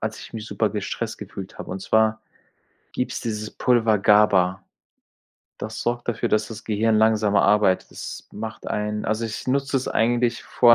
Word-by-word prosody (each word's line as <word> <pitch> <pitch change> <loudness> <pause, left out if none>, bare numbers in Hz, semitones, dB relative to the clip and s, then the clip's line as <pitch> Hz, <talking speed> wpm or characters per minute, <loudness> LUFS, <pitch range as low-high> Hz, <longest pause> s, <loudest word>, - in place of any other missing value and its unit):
als 110 0 -3
ich - - -11
mich 110 -1 -6
super 110 - 0
gestresst 105 -2 -4
gefühlt - - -8
habe, - - -7
und 95 +1 -4
zwar 110 +1 +2 0.7
gibt's - - -2
dieses 110 -2 -4
Pulver 115 -4 +2
GABA, 100 -2 +4 0.9
das 110 +1 -5
sorgt 120 0 -2
dafür, 120 0 0
dass 110 -1 +1
das 110 -1 -9
Gehirn 110 +1 +2
langsamer 110 -2 +3
arbeitet. 100 -2 +3
Das - - -8
macht 110 +1 -7
einen 105 0 -2
also, 110 +2 -1
ich 110 -1 -5
nutze 135 +1 +1
es 130 - -1
eigentlich 120 +1 +1
vor 120 -1 +5
110 Hz, 170 wpm, -23 LUFS, 105-115 Hz, 0.9 s, vor